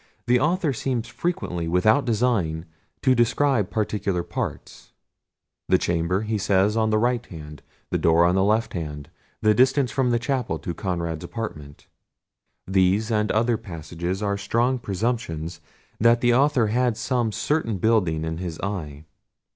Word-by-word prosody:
The 125 +1 +3
author 160 +1 +1
seems 125 -1 -2
frequently, 165 - -3
without 110 +10 +3
design, 105 -9 0 0.4
to 130 - +5
describe 120 -2 +2
particular 105 -4 -1
parts. - - -6 0.8
"The - - +5
chamber," 85 +4 0
says 100 +1 +2
he, 115 - 0
"on 110 0 +2
the 110 - +2
right 120 +2 +1
hand;" 75 -3 -10 0.3
"the - - 0
door 85 +1 +4
on 90 - +3
the 95 0 +3
left 110 +3 +1
hand;" 75 -4 -6 0.3
"the 110 0 +5
distance 130 +3 +3
from 130 -3 +1
the 120 - +2
chapel 125 0 -1
to 90 -5 -5
Conrad's 85 -3 -3
apartment:" 75 -11 -7 0.8
these 95 +4 +2
and 105 -1 +1
other 115 +1 +2
passages 85 +2 -5
are 100 -1 -1
strong 120 +5 +1
presumptions 95 -7 -3 0.4
that 115 +1 +4
the 120 -1 +4
author 135 -2 +3
had 120 0 +1
some 120 -4 0
certain 115 +1 -1
building 90 -7 +1
in 80 +1 -4
his 85 -3 -5
eye. 80 -7 -5
105 Hz, 150 wpm, -24 LUFS, 85-120 Hz, 0.8 s, to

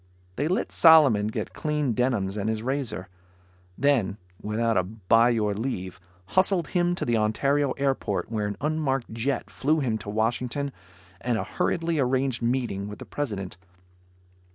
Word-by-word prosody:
They 145 - 0
let 185 - -1
Solomon 145 -11 +6
get 110 - -4
clean 150 -5 -1
denims 110 -5 0
and 105 +1 -1
his 110 0 -2
razor. 130 -8 -2 0.7
Then 130 -8 +2 0.2
without 115 +2 0
a 95 - +4
bye 110 +4 +2
your 110 -3 +1
leave, 100 -5 -4 0.3
hustled 185 -2 +2
him 175 -1 +1
to - - -3
the 120 -1 +2
Ontario 135 +6 +1
airport 135 -4 -1
where 105 -2 -1
an 105 - -4
unmarked 145 -5 -1
jet 120 +5 -2
flew 155 +4 +1
him 115 -6 -1
to 105 - -8
Washington 120 +6 -1 0.5
and 120 -2 0
a - - -1
hurriedly 165 -2 -1
arranged 130 -1 +1
meeting 120 -5 -1
with 105 - -8
the - - -9
President. 100 -11 -4
120 Hz, 155 wpm, -26 LUFS, 105-140 Hz, 0.7 s, Solomon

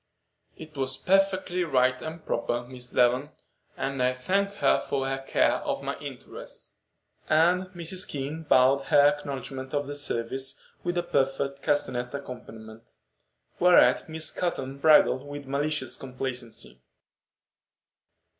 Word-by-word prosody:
"It 155 -1 -11
was 135 -1 -1
perfectly 190 -1 +2
right 130 -5 +2
and 160 +1 -7
proper, 120 +1 -1
Miss 125 0 -7
Devon; 125 +4 +2 0.5
and 135 -1 -2
I 125 0 +3
thank 195 +10 0
her - - +3
for 135 -1 -2
her 135 0 -1
care 135 - +2
of - - -3
my - - -2
interests." - - -9 0.5
And 175 +4 +4
Mrs. 180 0 -4
King 145 +3 -4
bowed 135 -2 +4
her 145 - +5
acknowledgment 140 -2 -3
of 145 0 0
the 145 - -5
service 135 -1 -3 0.2
with 175 0 -1
a 175 - +1
perfect 140 -2 0
castanet 125 -3 -1
accompaniment, 115 -4 -10 0.6
whereat 180 -1 +5
Miss 160 0 -2
Cotton 140 -6 -3
bridled 145 -3 +5
with 145 0 -8
malicious 140 0 -1
complacency. 125 - -6
140 Hz, 125 wpm, -27 LUFS, 130-160 Hz, 0.6 s, her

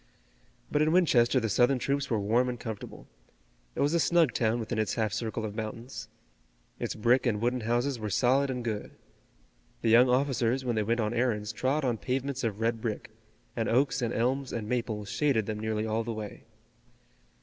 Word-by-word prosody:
But 150 - +2
in 155 +1 +3
Winchester 135 -8 +4
the 115 - -1
Southern 120 +6 +3
troops 140 +3 -1
were 115 -4 +1
warm 115 +5 +2
and 120 -1 -5
comfortable. 110 -4 -7 0.7
It - - -1
was 145 +3 +2
a 170 - +3
snug 165 -6 +3
town 115 0 +1
within 115 0 -3
its 110 - 0
half 110 -4 0
circle 110 0 -3
of 105 - -5
mountains. 115 +1 -6 0.7
Its - - -3
brick 120 +4 +3
and 105 -3 +1
wooden 120 +3 0
houses 120 +3 0
were 105 -1 -3
solid 130 +7 +2
and 125 -2 -3
good. 110 -3 -3 0.9
The 115 - +2
young 125 +2 +7
officers 130 -1 +1
when 120 -2 0
they 110 - +1
went 115 +3 0
on 105 +1 -1
errands 115 -3 0
trod 135 +5 0
on 120 -4 0
pavements 130 +1 -2
of 110 -3 -2
red 115 0 0
brick, 110 -2 -4 0.4
and 115 -2 -1
oaks 135 +3 +2
and 120 -1 0
elms 130 +4 0
and 110 -3 -4
maples 110 -4 -2
shaded 130 -4 +1
them 105 0 -4
nearly 110 0 -1
all 110 +1 0
the 115 +1 -4
way. 110 -2 -7
120 Hz, 195 wpm, -29 LUFS, 110-130 Hz, 0.9 s, young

